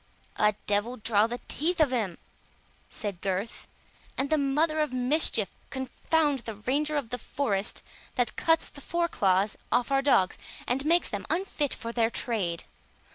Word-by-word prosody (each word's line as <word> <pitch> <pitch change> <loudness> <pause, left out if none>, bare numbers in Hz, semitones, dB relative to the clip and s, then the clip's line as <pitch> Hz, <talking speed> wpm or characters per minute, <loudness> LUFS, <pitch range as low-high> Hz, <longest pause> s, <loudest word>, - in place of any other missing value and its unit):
"A 210 -1 +3
devil 210 +5 0
draw 220 -1 +3
the 240 +1 -5
teeth 335 +4 -1
of 300 -4 +4
him," 215 -9 -1 0.7
said 200 -5 -5
Gurth, 195 +3 -3 0.5
"and 275 +2 -1
the 310 - +4
mother 305 +3 +1
of 300 -2 +1
mischief 250 - +2 0.2
confound 280 +2 0
the 225 -2 -6
Ranger 290 +8 0
of 265 -6 -3
the 245 - -2
forest, 210 -8 -2 0.3
that 245 -3 0
cuts 325 0 +2
the 285 - -12
foreclaws 210 - +1
off 245 +2 +2
our 270 0 +4
dogs, 255 -10 +3 0.3
and 260 +3 0
makes 340 +2 +3
them 205 -2 -4
unfit 320 -4 -1
for 230 - -5
their 230 -1 +2
trade! 195 -9 0
250 Hz, 155 wpm, -28 LUFS, 210-295 Hz, 0.7 s, of